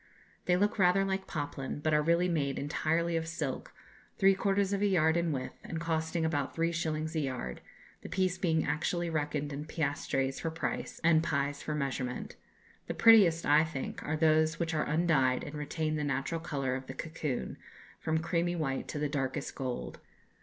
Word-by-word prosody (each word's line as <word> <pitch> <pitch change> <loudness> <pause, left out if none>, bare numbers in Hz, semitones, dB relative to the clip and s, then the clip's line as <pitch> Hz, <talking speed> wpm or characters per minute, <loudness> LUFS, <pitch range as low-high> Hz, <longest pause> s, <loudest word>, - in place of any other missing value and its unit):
They 180 0 +3
look 205 +2 +1
rather 190 +1 +4
like 190 0 -2
poplin, 145 -3 -4
but 155 +1 0
are 150 - +4
really 170 +3 +3
made 145 -6 0
entirely 165 +3 0
of 165 0 -1
silk, 155 -5 -4 0.5
three 195 0 +6
quarters 195 0 +1
of 200 - 0
a 205 - +4
yard 160 -4 +3
in 170 -1 +1
width, 130 -3 -4
and 165 - -4
costing 160 0 -1
about 145 -4 -1
three 165 +1 +1
shillings 160 -1 -2
a - - +2
yard, 130 - -3 0.4
the - - -8
piece 185 -1 0
being 160 -3 +1
actually 170 +2 -1
reckoned 150 -2 -2
in 145 +2 -5
piastres 140 -3 -1
for 165 - -2
price 165 +1 -4
and 165 -1 +5
pies 140 -2 -1
for 150 - -3
measurement. 135 -3 -3 0.5
The - - -3
prettiest, 195 -8 +6
I 150 +2 +6
think, 155 -5 -5
are 155 +1 -1
those 155 0 +3
which 165 -1 -1
are 155 - 0
undyed 150 -5 +2
and 145 - -7
retain 155 +1 -2
the 150 - -1
natural 145 +4 -1
colour 140 -6 -2
of 130 0 -5
the 130 - -7
cocoon, 155 -5 -4 0.4
from 160 0 0
creamy 170 +1 0
white 135 -5 -2
to - - -5
the 150 0 0
darkest 135 -2 -2
gold. 130 -2 -4
155 Hz, 185 wpm, -31 LUFS, 145-170 Hz, 0.5 s, three